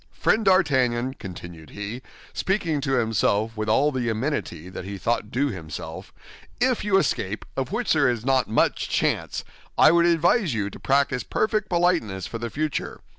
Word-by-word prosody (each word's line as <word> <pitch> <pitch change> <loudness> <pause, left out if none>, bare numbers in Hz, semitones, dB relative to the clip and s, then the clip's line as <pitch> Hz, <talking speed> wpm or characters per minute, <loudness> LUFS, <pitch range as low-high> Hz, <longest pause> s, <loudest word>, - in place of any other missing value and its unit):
Friend 220 - +1
D'Artagnan," 130 - +2
continued 85 - -10
he, 105 +5 -6 0.3
speaking 170 -7 0
to 135 -1 -1
himself 110 -2 +1
with 110 0 -3
all 140 +7 +3
the 125 -4 -1
amenity 110 - -3
that 90 0 -7
he 100 +1 -6
thought 105 +2 -1
due 140 +5 0
himself, 80 - -7 0.5
"if 250 -1 +1
you 200 -2 +3
escape, 110 - -1
of 135 +4 -3
which 235 +3 +1
there 145 -4 +3
is 120 -2 -2
not 130 -4 +2
much 110 - +1
chance, - - 0 0.3
I - - +7
would 170 0 +4
advise 170 - +2
you 100 -1 -2
to - - -11
practice 135 -2 +1
perfect 215 -1 -1
politeness 170 - +1
for 115 - -6
the 120 0 -4
future. 150 +4 -3
130 Hz, 170 wpm, -24 LUFS, 110-165 Hz, 0.5 s, I